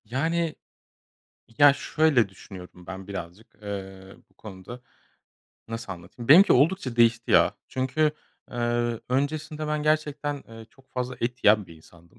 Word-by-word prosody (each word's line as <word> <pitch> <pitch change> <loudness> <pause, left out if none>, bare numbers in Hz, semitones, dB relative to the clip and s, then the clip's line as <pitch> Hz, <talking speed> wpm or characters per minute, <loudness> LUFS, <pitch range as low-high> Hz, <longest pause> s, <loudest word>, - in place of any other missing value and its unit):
Yani. 160 +7 -1 1.0
Ya, 145 -1 +8
şöyle 140 -5 +2
düşünüyorum 90 -2 -13
ben 95 0 -8
birazcık, 95 +2 -7 0.2
eee, 95 -1 -8
bu - - -32
konuda. 105 +4 -10 0.9
Nasıl 115 -3 -5
anlatayım? 90 +7 -11
Benimki 175 +8 +8
oldukça 140 -2 +2
değişti, 115 0 +3
ya. - - +5
Çünkü, 135 +4 0 0.4
eee, 120 -1 -1
öncesinde 150 +3 -2
ben 150 0 -1
gerçekten, 150 -2 -1
eee, 115 -1 -12
çok 135 -1 -25
fazla 125 0 -3
et 120 +2 -3
yiyen 105 -1 +5
bir 85 - -13
insandım. 85 +2 -21
120 Hz, 135 wpm, -26 LUFS, 100-145 Hz, 1.0 s, Ya